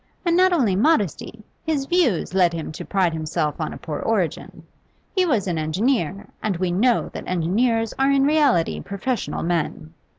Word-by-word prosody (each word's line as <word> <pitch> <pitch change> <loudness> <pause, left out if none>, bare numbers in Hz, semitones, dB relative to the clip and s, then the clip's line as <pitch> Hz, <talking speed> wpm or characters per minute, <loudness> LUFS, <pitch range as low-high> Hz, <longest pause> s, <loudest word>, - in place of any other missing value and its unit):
And 340 -1 +2
not 370 +1 +5
only 245 - +2
modesty; 215 - 0 0.2
his 300 -4 -1
views 275 - +1
lead 180 -3 +3
him 165 -2 -5
to 155 - -7
pride 185 -4 +1
himself 155 -1 -2
on - - -2
a - - -7
poor - - -5
origin. - - -2 0.5
He 370 -2 +3
was 235 - +1
an 175 -4 -1
engineer, 195 - -1 0.2
and 200 -5 -1
we 180 0 -1
know 230 +7 +2
that - - -7
engineers 225 +7 0
are 270 +1 +3
in 275 -1 +3
reality 285 - +2
professional 200 +4 -3
men. 165 -1 -2
200 Hz, 170 wpm, -22 LUFS, 170-270 Hz, 0.5 s, not